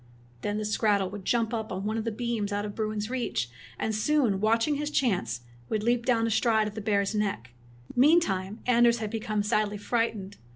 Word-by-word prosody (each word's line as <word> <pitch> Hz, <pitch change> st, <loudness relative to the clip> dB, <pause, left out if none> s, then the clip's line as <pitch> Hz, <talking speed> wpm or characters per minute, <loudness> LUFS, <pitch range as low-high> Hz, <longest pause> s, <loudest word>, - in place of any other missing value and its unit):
Then 205 Hz, 0 st, -2 dB
the 215 Hz, -, -2 dB
skrattel 205 Hz, -3 st, +1 dB
would 200 Hz, -2 st, -8 dB
jump 230 Hz, -1 st, +1 dB
up 220 Hz, -1 st, -3 dB
on 190 Hz, +2 st, -4 dB
one 215 Hz, +1 st, -1 dB
of 225 Hz, 0 st, -2 dB
the 230 Hz, -, -1 dB
beams 225 Hz, -2 st, -2 dB
out 205 Hz, 0 st, -1 dB
of 205 Hz, -, -5 dB
Bruin's 215 Hz, 0 st, -3 dB
reach; 175 Hz, -, -2 dB, 0.3 s
and 220 Hz, -, -1 dB
soon, 215 Hz, -3 st, +2 dB
watching 230 Hz, +7 st, +2 dB
his 295 Hz, +1 st, -2 dB
chance, 190 Hz, -, 0 dB, 0.3 s
would 215 Hz, -1 st, -1 dB
leap 235 Hz, +1 st, +1 dB
down 230 Hz, -3 st, +3 dB
astride 220 Hz, -1 st, +2 dB
of 210 Hz, -, -6 dB
the 215 Hz, -, -5 dB
bear's 200 Hz, -1 st, +1 dB
neck. 200 Hz, -, -2 dB, 0.4 s
Meantime 245 Hz, -, +3 dB
Anders 240 Hz, -1 st, +4 dB
had 215 Hz, -2 st, -4 dB
become 215 Hz, -2 st, -1 dB
sadly 210 Hz, 0 st, 0 dB
fright 230 Hz, +2 st, 0 dB
ened. 195 Hz, 0 st, -9 dB
215 Hz, 200 wpm, -28 LUFS, 205-235 Hz, 0.4 s, Anders